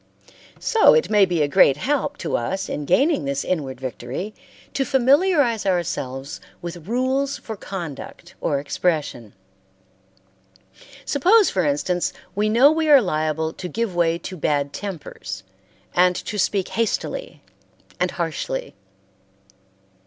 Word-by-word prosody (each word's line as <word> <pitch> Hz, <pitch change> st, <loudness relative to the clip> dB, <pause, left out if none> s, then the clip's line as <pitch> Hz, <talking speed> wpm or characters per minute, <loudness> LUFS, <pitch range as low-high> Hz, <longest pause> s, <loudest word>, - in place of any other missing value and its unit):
So 450 Hz, +1 st, +5 dB
it 470 Hz, -, +1 dB
may 205 Hz, -2 st, +6 dB
be 170 Hz, -4 st, +1 dB
a -, -, +1 dB
great 140 Hz, -1 st, +5 dB
help 285 Hz, -, -1 dB
to -, -, -2 dB
us 190 Hz, +11 st, -2 dB
in 145 Hz, -, -3 dB
gaining 275 Hz, -, +2 dB
this 140 Hz, 0 st, -2 dB
inward 135 Hz, -8 st, -2 dB
victory 130 Hz, -, -5 dB, 0.4 s
to 275 Hz, -, +1 dB
familiarize 270 Hz, -, +3 dB
ourselves 140 Hz, -7 st, -2 dB, 0.2 s
with 175 Hz, -1 st, -8 dB
rules 260 Hz, +4 st, 0 dB
for 220 Hz, -, -7 dB
conduct 175 Hz, -2 st, -8 dB
or 145 Hz, -, +1 dB
expression. 145 Hz, -, -2 dB, 1.7 s
Suppose, 385 Hz, +9 st, +4 dB
for 185 Hz, -, +1 dB
instance 160 Hz, +5 st, 0 dB, 0.2 s
we 210 Hz, +1 st, +1 dB
know 250 Hz, +7 st, +6 dB
we 315 Hz, 0 st, 0 dB
are 285 Hz, -2 st, +9 dB
liable 160 Hz, -, -1 dB
to 180 Hz, -, -6 dB
give 230 Hz, -2 st, -2 dB
way 170 Hz, -1 st, +2 dB
to 185 Hz, +2 st, -7 dB
bad 145 Hz, -3 st, 0 dB
tempers 165 Hz, -, -6 dB, 0.5 s
and 180 Hz, 0 st, +4 dB
to 210 Hz, -, -4 dB
speak 190 Hz, 0 st, 0 dB
hastily 230 Hz, -, -2 dB, 0.6 s
and 180 Hz, +1 st, +1 dB
harshly. 165 Hz, -6 st, -3 dB
180 Hz, 130 wpm, -22 LUFS, 150-245 Hz, 1.7 s, are